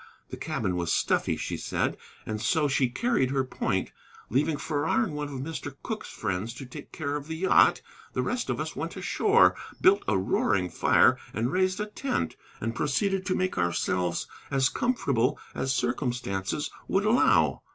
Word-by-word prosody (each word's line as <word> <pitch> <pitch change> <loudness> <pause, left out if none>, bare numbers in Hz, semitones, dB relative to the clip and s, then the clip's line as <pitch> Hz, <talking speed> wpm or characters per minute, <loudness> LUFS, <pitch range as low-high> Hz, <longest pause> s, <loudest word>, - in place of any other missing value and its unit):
The - - -4
cabin 90 - -2
was 85 -1 -1
stuffy, - - +1
she - - -3
said, - - -1 0.3
and 110 0 -3
so 155 +1 +2
she 135 -2 +2
carried 235 - +1
her 135 0 +1
point. 125 -1 -2 0.4
Leaving 145 +5 +2
Farrar 145 +8 0
and 190 -8 -3
one 150 0 -3
of 135 -3 -6
Mr. 145 -2 -5
Cooke's 220 -1 -4
friends 100 +5 -3
to 135 - -7
take 140 +4 -10
care 145 -2 -3
of 145 0 -5
the 160 - -4
yacht, 185 +4 +4 0.3
the - - 0
rest - - -2
of - - -1
us - - -4
went - - -4
ashore, 435 +3 +4 0.2
built 200 +2 +5
a 105 - +3
roaring 95 0 +1
fire - - +4 0.2
and 115 +4 0
raised 185 +2 +1
a 210 - 0
tent, 215 - -2 0.2
and 115 +1 -2
proceeded 190 - 0
to 185 - +1
make 185 - -1
ourselves 90 0 0 0.2
as 135 -1 +3
comfortable 145 - +1 0.2
as 130 - -1
circumstances 120 -2 -1 0.2
would 195 +2 +1
allow. 235 +4 +4
140 Hz, 170 wpm, -28 LUFS, 115-185 Hz, 0.4 s, built